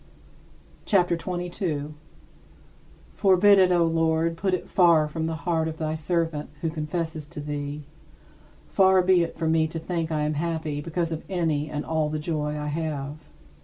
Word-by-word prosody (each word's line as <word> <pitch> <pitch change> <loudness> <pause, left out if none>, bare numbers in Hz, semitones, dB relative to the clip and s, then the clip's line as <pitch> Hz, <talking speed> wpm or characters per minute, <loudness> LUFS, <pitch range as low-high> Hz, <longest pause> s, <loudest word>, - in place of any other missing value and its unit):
CHAPTER 180 -4 +3
XXII 165 +3 -7 0.2
32. 155 -5 -3 1.2
Forbid 195 +1 +5
it, 185 -1 +5
O 175 -1 +4
Lord, 165 0 +1
put 185 +2 0
it - - -7
far 170 -4 +4
from 160 +1 -3
the 165 - -2
heart 165 -2 +1
of 160 0 -5
thy 155 -1 -2
servant, 160 -1 -1
who 165 - -1
confesses 160 0 -4
to 170 0 -9
thee 145 0 -4 0.8
far 190 -1 +4
be 185 -1 +4
it 170 - -2
from 160 -1 0
me 160 -1 +3
to 160 - -6
think 165 0 -3
I 155 -1 0
am 150 +1 0
happy 155 -1 -2
because 165 +1 -2
of 160 0 -3
any 160 -5 0
and 150 -1 -4
all 160 -2 0
the 155 - -2
joy 150 -1 -2
I 150 - -4
have. 150 -2 -3
160 Hz, 170 wpm, -25 LUFS, 150-170 Hz, 1.2 s, Forbid